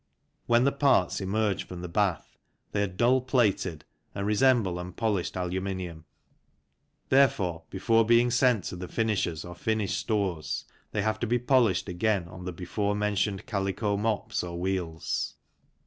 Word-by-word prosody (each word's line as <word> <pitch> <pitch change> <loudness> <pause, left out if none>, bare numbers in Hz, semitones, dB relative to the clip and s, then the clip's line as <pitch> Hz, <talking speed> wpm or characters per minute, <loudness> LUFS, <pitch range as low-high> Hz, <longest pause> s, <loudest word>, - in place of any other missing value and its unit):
When 120 +1 +4
the 140 - +3
parts 140 - +2
emerge 100 0 0
from 90 -1 -7
the 90 - -5
bath 95 0 -1 0.4
they 100 - 0
are 100 - +1
dull 120 +8 +2
plated 105 - 0 0.3
and 100 0 -2
resemble 105 -4 +3
unpolished 90 +1 -2
aluminium; 90 -2 -3 1.0
therefore, 95 -12 +3
before 115 +4 +3
being 120 +2 +4
sent 125 -5 +3
to - - -5
the 90 0 -6
finishers 95 -8 -1
or 90 - -7
finished 100 +1 -1
stores 100 -7 -2 0.3
they 105 - -1
have 110 0 0
to 120 - -1
be 120 +2 +2
polished 120 -7 +2
again 95 0 0
on 90 +1 -10
the 90 - -3
before 100 +4 -2
mentioned 105 -1 -1
calico 100 0 -1
mops 105 -1 -1
or 85 -1 -5
wheels. 90 -3 -2
100 Hz, 150 wpm, -28 LUFS, 90-115 Hz, 1.0 s, When